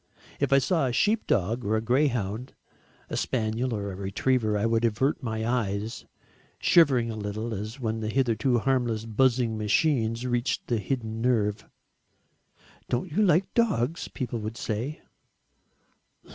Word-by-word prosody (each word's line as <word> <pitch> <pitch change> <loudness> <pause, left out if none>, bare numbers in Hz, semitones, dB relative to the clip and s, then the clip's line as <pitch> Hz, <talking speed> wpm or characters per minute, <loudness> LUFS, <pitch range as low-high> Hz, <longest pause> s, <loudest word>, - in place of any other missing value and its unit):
If - - 0
I 135 - +7
saw 150 0 +2
a - - -1
sheepdog, 120 - +1
or 110 0 +1
a - - +2
greyhound, 120 -2 0 0.6
a - - -1
spaniel 115 +1 -1
or 100 -3 -3
a - - -7
retriever, 105 +3 0
I 105 - 0
would 115 0 +1
avert 120 +7 +1
my 110 -3 -3
eyes, 110 -2 -2 0.5
shivering 130 -9 +4
a - - -5
little 110 +2 -4
as 110 +5 -5
when 110 -2 -2
the 110 -1 -3
hitherto 125 0 +1
harmless 120 -3 0
buzzing 115 0 +1
machine 115 +1 +2
reaches 120 0 0
the 120 -2 0
hidden 110 +1 -3
nerve. 110 -4 +1 1.2
"Don't 125 +8 -1
you 190 +8 +1
like 185 -2 +3
dogs?" 165 - +1
people 120 -3 -4
would 110 +2 -5
say. 120 +8 -3
115 Hz, 145 wpm, -27 LUFS, 110-130 Hz, 1.2 s, I